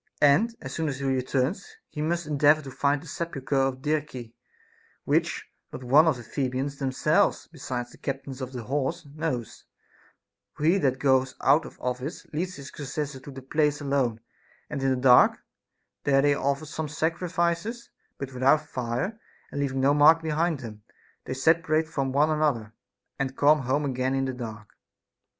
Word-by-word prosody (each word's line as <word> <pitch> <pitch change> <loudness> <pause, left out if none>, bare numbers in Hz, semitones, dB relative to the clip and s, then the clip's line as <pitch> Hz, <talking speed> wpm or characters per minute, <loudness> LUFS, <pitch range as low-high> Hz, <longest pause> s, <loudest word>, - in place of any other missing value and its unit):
And 205 +12 +4
as 130 -3 -7
soon 160 0 -1
as 135 - -4
he 140 - -4
returns, 135 - -1 0.2
he 150 - -5
must 170 +2 -1
endeavor 150 +1 +3
to 135 - -8
find 140 +2 0
the - - -12
sepulchre 145 -3 -4
of 135 -1 +1
Dirce, 145 -6 -2 0.7
which - - 0 0.3
not 130 - -8
one 145 +6 +5
of 155 -5 +2
the 120 - -9
Thebans 135 +2 -3
themselves, 135 -2 +1
besides 120 -1 -5
the - - -17
captains 135 -1 -5
of 130 0 -5
the 125 -3 -6
horse, 135 +5 -2
knows; 145 -5 -4 0.9
for - - -7
he 175 +5 +4
that 130 -5 +1
goes 130 -1 +2
out 145 +4 +4
of - - -10
his - - -27
office 125 +6 -4
leads 180 +4 -2
his 140 -1 -9
successor 145 0 -4
to 135 - -12
the 135 -1 -9
place 150 +1 +1
alone, 135 -6 0 0.5
and 145 -2 -3
in 135 - +2
the 130 - +2
dark; 125 -1 +6 0.7
there 135 -1 +3
they 145 0 +4
offer 140 +2 -1
some 155 +1 -4
sacrifices, 170 +7 -1 0.3
but 135 -1 -6
without 135 +4 +3
fire, 130 - -3 0.3
and 140 - -3
leaving 135 -1 -1
no 140 +2 +4
mark 155 +3 +6
behind 160 -1 0
them, 110 -3 -9 0.4
they 130 - -4
separate 160 +2 +2
from 135 -4 -2
one 150 +3 +3
another, 140 -8 0 0.5
and 135 -1 -2
come 150 +2 +5
home 135 +3 0
again 130 0 -1
in 135 0 0
the 130 - -2
dark. 110 -4 -7
140 Hz, 175 wpm, -26 LUFS, 130-155 Hz, 0.9 s, dark